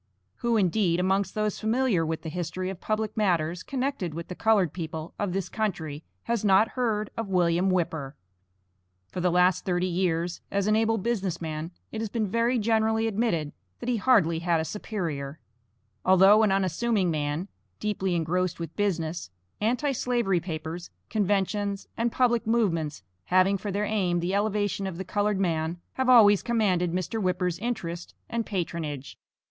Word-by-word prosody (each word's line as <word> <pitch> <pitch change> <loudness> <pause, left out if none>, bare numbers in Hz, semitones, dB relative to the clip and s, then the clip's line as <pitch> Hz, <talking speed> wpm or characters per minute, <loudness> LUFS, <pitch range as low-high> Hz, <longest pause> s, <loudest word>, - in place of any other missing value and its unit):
Who, 235 -1 +1
indeed, 185 -3 +2
amongst 190 +1 +1
those 215 -1 -1
familiar 220 -5 +1
with 160 0 -3
the 160 - -4
history 180 +3 -3
of 190 - -9
public 215 -1 -1
matters 175 -5 +1
connected 260 - -3
with 170 0 -6
the - - -4
colored 205 -7 +2
people 160 -2 -5
of 205 -3 -1
this 190 0 -2
country, 165 -9 -3 0.2
has 235 -2 -1
not 205 +2 +5
heard 220 -5 -1
of 225 -2 -3
William 180 0 +2
Whipper? 160 -6 -1 1.0
For 180 - -4
the 180 - +3
last 180 +1 +3
thirty 180 -1 0
years, 175 -1 -1
as 200 -1 0
an 215 0 +3
able 225 0 +2
business 195 -5 -1
man, 160 0 -4 0.2
it 220 - -4
has 225 - -2
been 225 0 -1
very 230 +5 +1
generally 220 0 +2
admitted, 195 -9 0 0.3
that 245 - -4
he 245 - +2
hardly 200 -9 +3
had 170 -1 +1
a 160 - -1
superior. 160 -6 -4 0.7
Although 190 +3 +6
an 215 -3 +3
unassuming 195 +1 +1
man, 150 +3 -2 0.3
deeply 195 -4 -1
engrossed 175 +2 0
with 165 -2 -6
business 170 - -1 0.3
Anti 250 +7 +1
slavery 240 -8 +1
papers, 165 0 -5 0.2
conventions, 205 -1 0
and 235 +1 0
public 240 -2 +2
movements 165 - 0 0.2
having 185 +2 +4
for 200 +1 -4
their 205 +2 0
aim 190 -5 +1
the 175 +3 -1
elevation 205 -1 0
of 180 -3 -5
the 190 - -5
colored 205 +1 0
man, 165 -2 -1
have 260 -1 0
always 210 -5 +7
commanded 200 -7 +1
Mr. 185 +5 -2
Whipper's 180 -2 0
interest 180 -7 -4
and 230 -1 -2
patronage. 160 -7 -4
190 Hz, 165 wpm, -27 LUFS, 170-215 Hz, 1.0 s, always